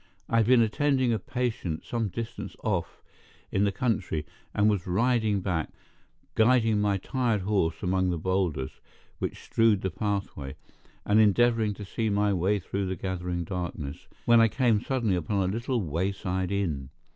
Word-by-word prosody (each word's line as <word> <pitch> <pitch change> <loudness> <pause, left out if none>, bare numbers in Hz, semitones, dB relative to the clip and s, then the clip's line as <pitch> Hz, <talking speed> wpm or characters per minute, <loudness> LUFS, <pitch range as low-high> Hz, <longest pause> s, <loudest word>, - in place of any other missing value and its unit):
I 115 - +1
had 110 -2 +3
been 125 -2 +6
attending 130 +1 +2
a 110 - 0
patient 115 -10 -3
some 115 -2 -1
distance 110 +5 -6
off - - -2 0.5
in 100 +1 +2
the 100 - +2
country, 95 -8 -1 0.3
and 105 +1 +2
was 100 -4 +1
riding 110 +1 +2
back, 90 -5 -1 0.6
guiding 115 -2 +3
my 100 -1 +2
tired 115 0 0
horse 95 -4 0
among 95 0 +1
the 85 - -1
boulders 85 -6 -1 0.4
which - - -4
strewed 115 -3 +3
the 95 - -2
pathway, 95 -9 -3 0.5
and 105 +1 +4
endeavoring 110 0 +3
to 105 - -8
see 110 +3 -2
my 105 0 +2
way 95 +3 +2
through 95 +1 -3
the 95 - -2
gathering 90 -2 -3
darkness, 85 -5 -5 0.2
when 120 -1 +6
I 115 - +6
came 115 -3 +2
suddenly 120 -7 0
upon 95 +2 0
a 95 - -1
little 120 +2 -1
wayside 95 +3 -2
inn. 80 -10 -1
100 Hz, 160 wpm, -27 LUFS, 90-115 Hz, 0.6 s, been